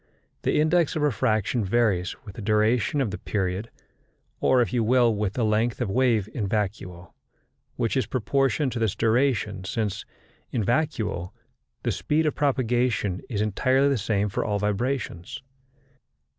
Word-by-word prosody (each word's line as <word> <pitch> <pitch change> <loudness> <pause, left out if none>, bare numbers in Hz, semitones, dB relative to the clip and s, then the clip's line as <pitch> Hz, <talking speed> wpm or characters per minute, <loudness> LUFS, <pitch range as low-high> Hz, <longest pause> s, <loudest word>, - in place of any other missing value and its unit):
The - - +1
index 160 +1 +2
of 155 - 0
refraction 115 -4 +1
varies 100 -3 +1
with 100 - -9
the 110 - -8
duration 110 +6 +2
of 115 -7 -1
the 105 - -5
period, 95 +2 -2 0.7
or, 130 - +3
if 120 - +1
you 120 -2 +2
will, 120 0 +4
with 105 -2 -1
the 120 -1 0
length 110 +2 +1
of 120 -6 -1
wave 115 -4 +2
in 105 -5 -2
vacuo 95 -4 -3 0.6
which 115 +1 -1
is 130 -5 +1
proportioned 135 +2 0
to 120 - -3
this 110 -3 0
duration, 115 -4 +1
since 105 0 -2 0.5
in 115 - 0
vacuo 115 - -1 0.5
the - - 0
speed 155 +2 0
of 150 - +1
propagation 120 -8 0
is 105 -5 -1
entirely 130 +6 +2
the 140 - +2
same 105 0 0
for 100 - -2
all 105 -1 -1
vibrations. 105 +2 -2
115 Hz, 155 wpm, -25 LUFS, 105-130 Hz, 0.7 s, will